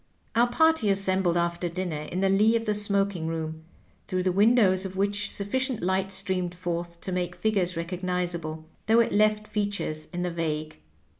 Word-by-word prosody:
Our 240 +1 +5
party 320 -2 +3
assembled 190 -3 +2
after 170 0 -1
dinner 170 -3 -3
in 185 - -2
the 195 - +3
lee 210 +4 +4
of 230 0 0
the 210 - +1
smoking 200 -4 0
room, 160 -1 -4 0.4
through 185 -2 -1
the 185 - +2
windows 200 -1 +4
of 190 -1 -4
which 205 +1 +1
sufficient 255 +4 -1
light 190 +1 0
streamed 185 -2 -1
forth 170 -1 -4
to 190 - -5
make 180 -1 -2
figures 190 -5 0
recognizable, 170 -2 -3 0.2
though 225 +1 +5
it 230 - 0
left 215 +1 +2
features 200 -7 -3
in 175 0 -3
the 180 - -1
vague. 155 -2 -3
185 Hz, 170 wpm, -27 LUFS, 175-205 Hz, 0.4 s, Our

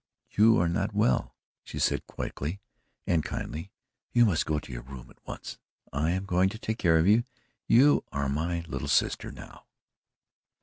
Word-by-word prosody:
"You 110 +2 +5
are 85 - +2
not 100 +4 -1
well," 110 +3 +1 0.3
she - - -8
said - - 0
quickly 80 +8 -5 0.5
and 85 -3 +2
kindly. 80 +6 -5 0.4
"You 120 -1 +5
must 90 -8 +1
go 75 - +1
to 70 - -7
your - - -5
room 65 -1 -11
at - - -23
once. - - -7 0.3
I 75 +4 +1
am 95 +2 -1
going 95 0 +2
to 110 - -7
take 110 +1 -4
care 85 -5 +4
of 80 - +3
you 110 +4 +5 0.4
you 135 +6 +5
are 70 -1 -1
MY 85 +5 -1
little 70 - -4
sister 70 - +1
now." - - -13
85 Hz, 175 wpm, -28 LUFS, 75-105 Hz, 0.5 s, You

